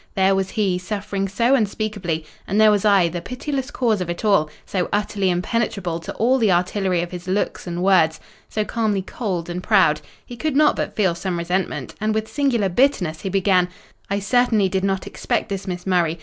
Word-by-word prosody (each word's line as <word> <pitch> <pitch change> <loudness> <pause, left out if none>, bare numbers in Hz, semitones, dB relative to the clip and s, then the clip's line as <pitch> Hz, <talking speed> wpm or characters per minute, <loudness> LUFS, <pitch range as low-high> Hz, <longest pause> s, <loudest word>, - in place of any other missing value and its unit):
There 195 0 +4
was 190 0 0
he, 195 -5 0
suffering 200 0 -3
so 235 +7 +2
unspeakably, 205 -8 -1 0.2
and 200 +4 +1
there 215 0 +7
was 205 0 +1
I, 200 -4 +5
the 170 +1 -4
pitiless 265 - -4
cause 225 -8 0
of 175 - -3
it 175 +5 -4
all, 195 -8 +3 0.2
so 185 -3 -2
utterly 205 -2 0
impenetrable 180 -2 -1
to - - -7
all 255 +4 +2
the 220 -5 +3
artillery 180 0 +1
of 175 - -7
his 180 0 -8
looks 190 0 -1
and 175 +1 -3
words, 170 -5 +4 0.3
so 215 -1 -1
calmly 210 -4 -1
cold 185 -5 -3
and 175 +1 -4
proud, 185 -8 +3 0.2
he 245 - -9
could 305 +3 -2
not 300 +1 +5
but - - -3
feel 190 -5 +2
some 175 +1 -3
resentment; 170 -5 -2
and 215 0 0
with 220 0 -1
singular 250 -8 +1
bitterness 180 - +1
he 195 - -3
began—'I 190 0 -1
certainly 215 -1 +2
did 190 0 -1
not 195 -1 0
expect - - -2
this, 195 0 -4
Miss 180 -1 -4
Murray. 175 -3 +1
195 Hz, 195 wpm, -21 LUFS, 180-215 Hz, 0.3 s, there